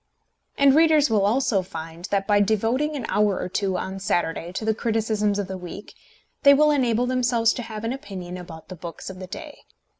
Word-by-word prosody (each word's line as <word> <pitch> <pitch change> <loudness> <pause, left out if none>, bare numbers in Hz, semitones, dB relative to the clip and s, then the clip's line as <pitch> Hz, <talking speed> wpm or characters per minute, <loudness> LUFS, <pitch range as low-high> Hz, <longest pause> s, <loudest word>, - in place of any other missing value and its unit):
And 280 -1 +6
readers 310 -4 +4
will 210 -3 +3
also 215 -1 +2
find 165 -1 -8
that 195 0 -1
by 205 0 +3
devoting 225 +9 +1
an 275 - -4
hour 205 -2 +1
or - - -3
two 190 0 -1
on 190 +1 -5
Saturday 175 -2 -1
to 215 - -4
the 220 - +2
criticisms 215 -2 0
of 200 -2 -2
the 190 -1 -6
week, 180 +3 -9 0.5
they 280 -1 +7
will 300 +1 +4
enable 245 -4 +2
themselves 245 -2 +2
to - - -5
have 220 -2 -7
an 230 +2 -1
opinion 190 -8 -7
about 170 -2 -10
the 185 - -7
books 170 +2 -8
of 185 - -11
the 185 - -7
day. - - -9
210 Hz, 205 wpm, -24 LUFS, 185-245 Hz, 0.5 s, they